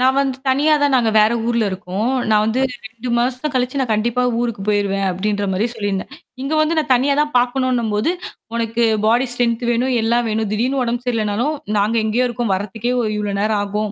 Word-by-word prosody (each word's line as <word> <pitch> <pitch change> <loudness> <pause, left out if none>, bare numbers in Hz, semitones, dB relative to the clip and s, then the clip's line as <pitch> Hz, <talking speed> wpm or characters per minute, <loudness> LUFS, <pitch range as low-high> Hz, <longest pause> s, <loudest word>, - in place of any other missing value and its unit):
நான் 260 +1 +3
வந்து 270 -2 0
தனியா 295 +4 +3
தான் 285 -2 +3
நாங்க 230 -3 +2
வேற 215 +2 +4
ஊர்ல 235 -2 +1
இருக்கோம். 190 +5 -3 0.2
நான் 210 0 +4
வந்து 225 +4 0 0.3
2 230 +2 -8
மாசம் 255 +4 -1
கழிச்சு 255 +2 0
நான் 250 -4 -1
கண்டிப்பா 235 +3 0 0.2
ஊருக்கு 235 -5 -2
போயிருவேன், 200 -1 +1
அப்பிடின்றமாரி 200 +2 -1
சொல்லியிருந்தேன். 205 -3 -3 0.3
இங்க 275 +3 -3
வந்து 315 +1 +1
நான் 300 - -1
தனியா 275 +3 +2
தான் 300 0 0
பார்க்கணுன்னும்போது, 245 -1 0 0.4
உனக்கு 230 0 0 0.2
பாடி 240 +4 +3
ஸ்ட்ரெங்த் 240 -1 0
வேணும், 250 +2 +1
எல்லாம் 235 +1 +2
வேணும். 220 -1 -1
திடீர்ன்னு 255 +5 0
உடம்பு 240 +1 -2
சரியில்லனாலும் 230 +5 0 0.2
நாங்க 215 +3 +1
எங்கேயோ 240 +4 +1
இருக்கோம் 240 -4 -2
வர்றதுக்கே 210 +5 -3
இவ் 225 -3 0
இவ்ளோ 205 -1 -2
நேரம் 210 -1 +1
ஆகும். 210 +1 -2
235 Hz, 180 wpm, -19 LUFS, 210-255 Hz, 0.4 s, வேற